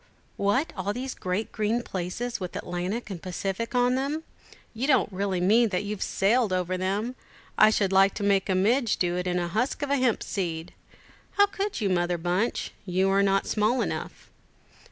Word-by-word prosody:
"What, 230 Hz, +10 st, +1 dB
all 195 Hz, +1 st, -2 dB
these 255 Hz, +2 st, -4 dB
great 185 Hz, +4 st, -3 dB
green 220 Hz, +3 st, 0 dB
places, 195 Hz, +7 st, -4 dB
with 180 Hz, -2 st, -6 dB
Atlantic 185 Hz, +6 st, -3 dB
and 175 Hz, -3 st, -6 dB
Pacific 195 Hz, +6 st, -3 dB
on 245 Hz, 0 st, +3 dB
them; 280 Hz, +5 st, -1 dB, 0.5 s
you 245 Hz, +4 st, -2 dB
don't 260 Hz, -8 st, +3 dB
really 190 Hz, -1 st, -1 dB
mean 220 Hz, +6 st, +4 dB
that 185 Hz, 0 st, -1 dB
you've 205 Hz, -1 st, -5 dB
sailed 215 Hz, +2 st, +2 dB
over 185 Hz, 0 st, 0 dB
them! 200 Hz, +6 st, -1 dB, 0.4 s
I 215 Hz, -, +7 dB
should 200 Hz, -3 st, +1 dB
like 195 Hz, +1 st, +5 dB
to -, -, -4 dB
make 195 Hz, -1 st, +2 dB
a 190 Hz, -, +2 dB
midge 230 Hz, +5 st, +2 dB
do 175 Hz, -1 st, 0 dB
it 180 Hz, 0 st, -2 dB
in 180 Hz, 0 st, 0 dB
a 175 Hz, -1 st, -1 dB
husk 235 Hz, -, -1 dB
of 285 Hz, -, -2 dB
hemp 255 Hz, -5 st, +2 dB
seed! 170 Hz, -4 st, -3 dB, 0.6 s
How 405 Hz, -, +6 dB
could 400 Hz, -, -3 dB
you, 205 Hz, -, +1 dB
Mother 175 Hz, -1 st, +1 dB
Bunch? 180 Hz, +7 st, -1 dB
You 190 Hz, +1 st, +1 dB
are 195 Hz, 0 st, +4 dB
not 195 Hz, 0 st, +2 dB
small 220 Hz, +4 st, +1 dB
enough." -, -, -6 dB
200 Hz, 185 wpm, -26 LUFS, 185-240 Hz, 0.6 s, I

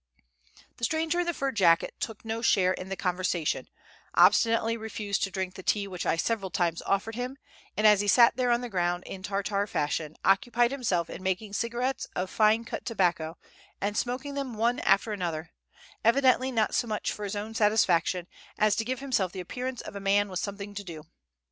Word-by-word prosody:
The -, -, -14 dB
stranger 320 Hz, +6 st, +1 dB
in 350 Hz, -, 0 dB
the 345 Hz, -, +1 dB
fur 275 Hz, 0 st, -1 dB
jacket 180 Hz, -8 st, +3 dB
took 225 Hz, -1 st, -5 dB
no 225 Hz, +1 st, -3 dB
share 185 Hz, -5 st, +3 dB
in 185 Hz, 0 st, -7 dB
the 195 Hz, -, -2 dB
conversation, 180 Hz, -3 st, -1 dB, 0.5 s
obstinately 230 Hz, 0 st, +4 dB
refused 215 Hz, -2 st, -3 dB
to 195 Hz, -, 0 dB
drink 190 Hz, -1 st, -3 dB
the 190 Hz, -, -9 dB
tea 200 Hz, +1 st, 0 dB
which 180 Hz, -3 st, -5 dB
I -, -, +3 dB
several 195 Hz, +2 st, -1 dB
times 170 Hz, -2 st, 0 dB
offered 200 Hz, +3 st, 0 dB
him, 250 Hz, +3 st, -4 dB, 0.4 s
and 215 Hz, -, +1 dB
as 210 Hz, -2 st, +7 dB
he 205 Hz, -, -2 dB
sat 235 Hz, +4 st, +6 dB
there 250 Hz, 0 st, +1 dB
on 240 Hz, 0 st, +2 dB
the 245 Hz, -, -4 dB
ground 175 Hz, -3 st, -1 dB
in 190 Hz, -, -7 dB
Tartar 200 Hz, +1 st, -1 dB
fashion, 150 Hz, -2 st, -2 dB
occupied 240 Hz, +5 st, +3 dB
himself 195 Hz, -11 st, 0 dB
in -, -, -8 dB
making 190 Hz, +2 st, -2 dB
cigarettes 240 Hz, +5 st, -2 dB
of 185 Hz, +1 st, -2 dB
fine 220 Hz, +1 st, +3 dB
cut -, -, -5 dB
tobacco, 175 Hz, -7 st, 0 dB, 0.4 s
and 205 Hz, +1 st, -2 dB
smoking 255 Hz, +5 st, -2 dB
them 275 Hz, -4 st, -4 dB
one 235 Hz, +3 st, +1 dB
after 215 Hz, +2 st, +2 dB
another, 170 Hz, -4 st, -4 dB, 0.5 s
evidently 260 Hz, +2 st, +4 dB
not 225 Hz, -3 st, +1 dB
so 240 Hz, -, +1 dB
much 215 Hz, -1 st, -2 dB
for 210 Hz, -, -6 dB
his 205 Hz, 0 st, -3 dB
own 210 Hz, +2 st, -5 dB
satisfaction 185 Hz, -5 st, +2 dB, 0.3 s
as 215 Hz, -1 st, +3 dB
to 225 Hz, -, +1 dB
give 255 Hz, +2 st, -3 dB
himself 230 Hz, -10 st, 0 dB
the 190 Hz, -, -7 dB
appearance 250 Hz, +7 st, -4 dB
of -, -, -9 dB
a -, -, -4 dB
man 200 Hz, +1 st, +2 dB
with 185 Hz, -1 st, -3 dB
something 200 Hz, 0 st, -5 dB
to 205 Hz, 0 st, -6 dB
do. 165 Hz, -5 st, -8 dB
205 Hz, 200 wpm, -28 LUFS, 185-235 Hz, 0.5 s, as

